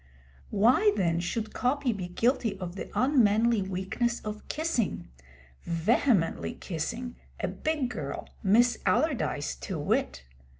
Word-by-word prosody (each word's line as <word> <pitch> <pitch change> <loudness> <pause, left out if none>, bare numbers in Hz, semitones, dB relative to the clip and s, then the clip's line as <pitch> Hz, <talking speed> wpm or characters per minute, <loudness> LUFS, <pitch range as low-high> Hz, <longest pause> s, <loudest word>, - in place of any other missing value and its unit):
Why, 255 - +4
then, 170 -2 +1
should 215 +5 -3
Coppy 255 0 +1
be 185 -4 -5
guilty 225 +2 0
of 180 -1 -6
the - - -6
unmanly 235 -4 +3
weakness 190 +6 -1
of 210 0 -7
kissing 310 - -1 0.5
vehemently 170 - +1
kissing 230 +9 -4 0.2
a - - -1
'big 305 -5 -1
girl,' 150 -11 -5
Miss 235 +5 +4
Allardyce 270 - +1
to - - -5
wit? 65 - -1
220 Hz, 120 wpm, -28 LUFS, 185-250 Hz, 0.5 s, Why